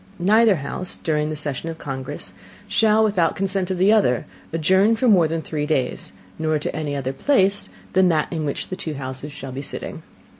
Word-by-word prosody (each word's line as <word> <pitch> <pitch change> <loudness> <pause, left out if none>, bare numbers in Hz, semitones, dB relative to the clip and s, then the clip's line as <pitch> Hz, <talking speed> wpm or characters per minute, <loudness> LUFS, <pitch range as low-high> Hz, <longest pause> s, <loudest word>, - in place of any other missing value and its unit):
Neither 215 +3 +4
House, 175 +5 -5
during 150 -1 -1
the 155 - -3
Session 150 +1 -3
of 165 - -6
Congress, 130 -4 -6 0.3
shall, 220 0 +4
without 190 -6 +2
the - - -11
Consent 195 -1 0
of 185 - -1
the 195 +4 +5
other, 125 - +2 0.3
adjourn 190 +7 +3
for 250 +3 +1
more 185 -7 +5
than 160 0 -3
three 150 -2 -3
days, 135 -5 -1 0.3
nor 155 -1 +1
to 150 - -4
any 150 -2 -2
other 135 -1 -2
Place 200 - +2 0.2
than 185 0 +5
that 155 -3 +2
in 160 -2 -2
which 145 -2 -3
the 185 - -3
two 155 -4 -5
Houses 130 +2 -6
shall 135 -2 -8
be 135 +2 -5
sitting. 140 - -6
160 Hz, 200 wpm, -22 LUFS, 145-190 Hz, 0.3 s, the